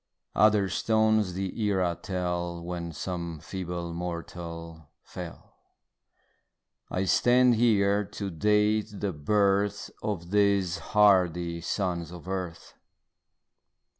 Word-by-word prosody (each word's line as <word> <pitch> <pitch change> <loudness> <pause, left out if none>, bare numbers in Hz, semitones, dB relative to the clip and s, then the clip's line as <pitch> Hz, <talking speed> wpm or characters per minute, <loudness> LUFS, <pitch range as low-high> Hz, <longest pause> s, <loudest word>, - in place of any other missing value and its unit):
Other 105 0 +4
stones 110 0 +2
the 95 +4 -4
era 95 -5 +1
tell 90 -2 -3
When 85 -1 -4
some 85 +1 -5
feeble 85 0 -5
mortal 85 -2 -6
fell; - - -9 1.4
I 95 +1 -1
stand 125 +5 +4
here 105 -3 +3
to 100 0 -5
date 105 +4 +2
the 100 -2 -2
birth 100 +5 +1
Of 90 -4 -4
these 100 -4 +2
hardy 90 -3 +3
sons 85 -2 -2
of 90 0 -10
earth. 90 -3 -5
95 Hz, 100 wpm, -28 LUFS, 85-105 Hz, 1.4 s, Other